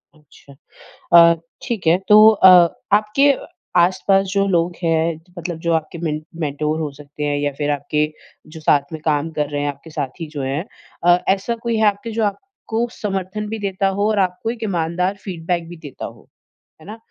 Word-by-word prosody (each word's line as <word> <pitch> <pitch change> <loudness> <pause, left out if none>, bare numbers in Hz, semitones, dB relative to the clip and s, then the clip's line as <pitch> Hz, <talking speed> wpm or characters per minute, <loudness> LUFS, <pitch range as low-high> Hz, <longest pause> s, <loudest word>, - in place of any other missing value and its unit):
अच्छा। 150 -2 -19 0.6
अ, 170 -1 +8 0.3
ठीक 215 -8 -3
है, 165 +2 +5
तो 210 - +7
अ, 200 -3 +6 0.5
आपके 215 +7 +3 0.5
आसपास 195 +2 +2
जो 200 -1 +2
लोग 175 -2 +1
हैं, 165 -1 +1 0.2
मतलब 175 -1 -5
जो 170 +1 -1
आपके 160 +1 -2
मेंट 155 0 -4 0.2
मेंटोर 150 +1 -1
हो 155 -2 -3
सकते 150 0 -8
हैं 145 -1 0
या 145 0 -1
फिर 145 -1 -1
आपके 150 +2 -1 0.5
जो - - -7
साथ 145 -2 +2
में 160 - -6
काम 150 0 +1
कर 150 -1 0
रहे 145 -1 -3
हैं, 145 - -1
आपके 140 +3 -9
साथी 150 +2 -5
जो 145 - -3
हैं 135 +5 -2 0.4
अ, 175 0 +6 0.2
ऐसा 200 +4 -3
कोई 230 -1 0
है 220 - +3
आपके, 205 +3 -1
जो 225 0 -1
आपको 230 - -3
समर्थन 195 +1 -3
भी 225 0 -4
देता 195 -1 -1
हो 205 - +2
और 215 -2 +1
आपको 185 +4 -1
एक 230 -1 -7
ईमानदार 180 -1 -1
फ़ीडबैक 170 -2 -3
भी 175 - -9
देता 150 -4 -8
हो, - - -12 0.5
है - - -15
ना? 215 +2 -8
170 Hz, 190 wpm, -20 LUFS, 150-200 Hz, 0.6 s, अ